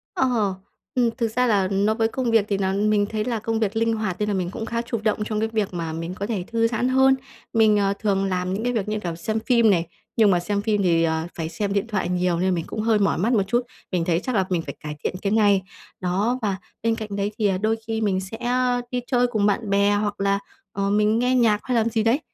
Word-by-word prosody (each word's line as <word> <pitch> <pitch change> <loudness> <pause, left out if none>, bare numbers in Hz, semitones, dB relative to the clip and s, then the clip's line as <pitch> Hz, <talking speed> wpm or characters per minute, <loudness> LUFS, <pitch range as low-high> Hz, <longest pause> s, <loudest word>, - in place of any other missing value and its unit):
Ờ. 235 - +1 0.4
Ừm, 240 -2 +3
thực 230 -3 +1
ra 250 +3 +1
là 200 -4 +2
nó 200 +3 +2
với 225 0 +1
công 245 0 -2
việc 220 -3 +4
thì 200 - +1
nà 190 -1 0
mình 205 0 +2
thấy 215 -1 -2
là 235 -3 -1
công 225 +1 -1
việc 215 -1 -1
linh 225 0 +2
hoạt 210 -5 -2
nên 210 0 0
là 205 - 0
mình 180 -2 -1
cũng 225 - -5
khá 230 0 -2
chủ 235 0 -3
động 215 -1 +1
trong 215 -1 -2
cái 220 0 0
việc 205 -4 -1
mà 165 -2 -3
mình 165 +2 -4
có 200 +2 -4
thể 205 -6 -2
thư 230 0 +1
giãn 245 +2 0
hơn. 265 +1 +5 0.4
Mình, 220 -2 +4
ờ, 200 -1 +2
thường 195 -2 +1
làm 185 -1 -1
những 210 - -3
cái 245 0 0
việc 210 -3 -1
như, 215 0 -1
kiểu, 170 -4 -4
xem 220 +6 -2
phim 235 -1 +3
này, 170 -2 +1 0.3
nhưng 215 -3 +5
mà 175 - +3
xem 200 +3 -1
phim 210 -1 +1
thì, 165 -2 +3
ờ, 160 0 0
phải 160 -1 -3
xem 200 +4 -2
điện 200 +2 0
thoại 205 -5 -1
nhiều 180 -1 +1
nên 185 0 +2
mình 170 -2 -2
cũng 215 - -4
hơi 220 -1 +2
mỏi 195 - +2
mắt 225 +8 +1
một 205 -4 +3
chút. 240 +4 +2 0.3
Mình 175 -3 0
thấy 170 -1 +2
chắc 255 +5 -3
là 190 -2 +2
mình 175 -3 +1
phải - - -7
cải 150 0 -6
thiện - - -2
cái 200 - -1
ngày. 205 -3 +4 0.4
Đó, 200 +8 0
và 200 -3 0 0.3
bên 225 0 +2
cạnh 215 -3 -6
đấy 200 +1 -1
thì, 210 - +3
à, 190 -2 +1
đôi 215 +3 +1
khi 225 0 -2
mình 195 -3 +1
sẽ 190 +4 -7 0.5
đi 250 -1 -1
chơi 245 -2 +2
cùng 215 -4 0
bạn 210 +1 0
bè 200 +1 +3
hoặc 205 0 -2
là, 200 0 +1 0.3
ờ, 200 0 -1
mình 210 +2 +2
nghe 250 +1 +2
nhạc 225 -4 +3
hay 250 - -1
làm 230 0 +2
gì 220 -1 0
đấy. 230 +5 +3
210 Hz, 275 wpm, -23 LUFS, 190-225 Hz, 0.5 s, hơn